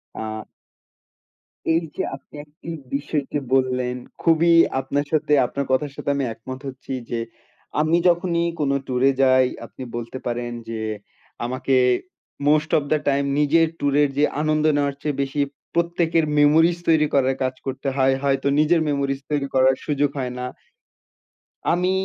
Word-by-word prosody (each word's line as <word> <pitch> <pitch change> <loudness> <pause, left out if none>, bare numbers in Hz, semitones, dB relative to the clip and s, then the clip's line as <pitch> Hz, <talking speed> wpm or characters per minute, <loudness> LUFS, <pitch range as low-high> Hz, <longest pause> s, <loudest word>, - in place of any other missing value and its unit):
আ 110 0 -5 1.3
এইযে 160 -2 0
আপনি 140 - -24
একটি 150 +2 -16 0.3
বিষয়কে 145 0 -2
বললেন 125 -1 +1 0.3
খুবই 165 0 +4 0.3
আপনার 140 +2 -2
সাথে, 150 -1 +1
আপনার 140 +3 -3
কথার 135 +1 +1
সাথে - - -3
আমি 140 - 0
একমত 130 +4 -8
হচ্ছি 130 0 -8 0.2
যে, 120 -1 -1 0.6
আমি 160 +2 +3
যখনই 170 -1 +1 0.2
কোনো 140 -1 +1
ট্যুরে 130 +1 +3
যাই 130 -1 +5 0.2
আপনি 130 - -11
বলতে 120 +2 -5
পারেন 120 0 -2 0.2
যে, 115 -1 -4 0.6
আমাকে 130 +2 -1 0.7
মোস্ট 155 +1 +3
ওফ 145 - -3
দা 155 - +4
টাইম 140 0 +2
নিজের 160 +3 +4
ট্যুরের 145 0 +3
যে 150 - +4 0.2
আনন্দ 155 0 +1
নেওয়ার 140 -1 0
চেয়ে 145 -2 -2
বেশি 135 +2 -2 0.3
প্রত্যেকের 170 -1 +1
মেমোরিজ 160 +4 +5
তৈরি 155 -2 +4
করার 135 -1 +3
কাজ 130 0 0
করতে 135 +1 -3
হয়। 135 0 +3
হয়তো 140 0 0
নিজের 165 +2 +3
মেমোরিজ 140 -1 -1
তৈরি 145 -2 0
করার 130 0 +5
সুযোগ 145 -1 +1
হয় 125 -1 -2
না। 125 - -3 1.3
আমি 180 +2 +1
140 Hz, 145 wpm, -22 LUFS, 130-155 Hz, 1.3 s, যাই